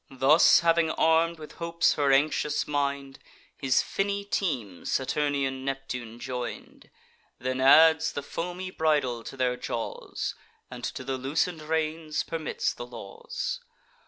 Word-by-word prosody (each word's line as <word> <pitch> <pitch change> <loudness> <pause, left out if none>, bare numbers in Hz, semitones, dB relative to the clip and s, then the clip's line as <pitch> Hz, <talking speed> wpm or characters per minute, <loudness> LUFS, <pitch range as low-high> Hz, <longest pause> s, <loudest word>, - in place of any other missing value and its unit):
Thus 135 +6 +5
having 165 -1 +3
arm'd 165 +1 +2
with 155 -1 -10
hopes 170 0 +2
her 140 -2 +2
anxious 150 +1 +2
mind, 140 -2 -2 0.4
His 135 -2 +2
finny 200 0 -2
team 125 - -2
Saturnian 135 -1 -1
Neptune 125 -4 -5
join'd, 125 -1 -6 0.5
Then 130 +1 -2
adds 160 +4 +6
the 145 - -4
foamy 180 +5 -5
bridle 145 -9 +1
to 135 - -9
their 125 -1 +1
jaws, 120 -2 -4 0.4
And - - -8
to - - -5
the 130 0 -3
loosen'd 155 +5 -1
reins 155 0 -1
permits 160 -2 -2
the 120 - -8
laws. 485 - -5
145 Hz, 130 wpm, -27 LUFS, 130-165 Hz, 0.5 s, adds